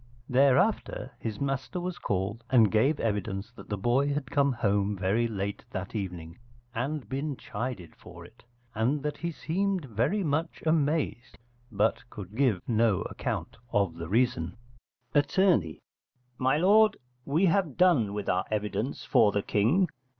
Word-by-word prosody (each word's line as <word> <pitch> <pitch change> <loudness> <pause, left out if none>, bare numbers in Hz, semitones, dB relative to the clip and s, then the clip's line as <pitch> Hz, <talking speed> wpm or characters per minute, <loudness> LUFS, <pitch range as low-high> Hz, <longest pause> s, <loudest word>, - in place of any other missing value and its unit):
Thereafter 135 - +2
his 110 -3 -4
master 135 +5 -2
was 180 0 -4
called, 100 +4 -2
and 115 -5 +5
gave 135 +8 +2
evidence 105 -1 -2
that 120 - -14
the 105 - -2
boy 125 +8 +2
had 140 -2 -3
come 140 -1 +3
home 105 -4 0
very 100 +5 +1
late 100 -2 -4
that 95 +1 -5
evening 90 -5 -5 0.3
and 135 +4 -3
been 140 +1 -3
chided 105 -6 -5
for - - -12
it, - - -18 0.3
and 125 +6 0
that 150 0 -2
he 170 - -2
seemed 185 +2 -1
very 125 - 0
much 160 +1 -2
amazed, 155 -5 0 0.3
but 105 +1 +1
could 100 -3 -9
give 120 -8 +2
no 110 -4 +2
account - - -4
of 100 -5 +1
the 85 -1 -7
reason. 100 -7 +1 0.6
Att. 145 +3 +1 1.0
My 130 +3 +2
lord, 210 +5 +5 0.3
we 155 +8 +2
have 180 -5 +1
done 165 - +4
with 105 -1 -4
our 90 0 +1
evidence 110 +4 -2
for 105 - +4
the 100 -1 -1
King. 135 - +2
120 Hz, 150 wpm, -28 LUFS, 105-145 Hz, 1.0 s, and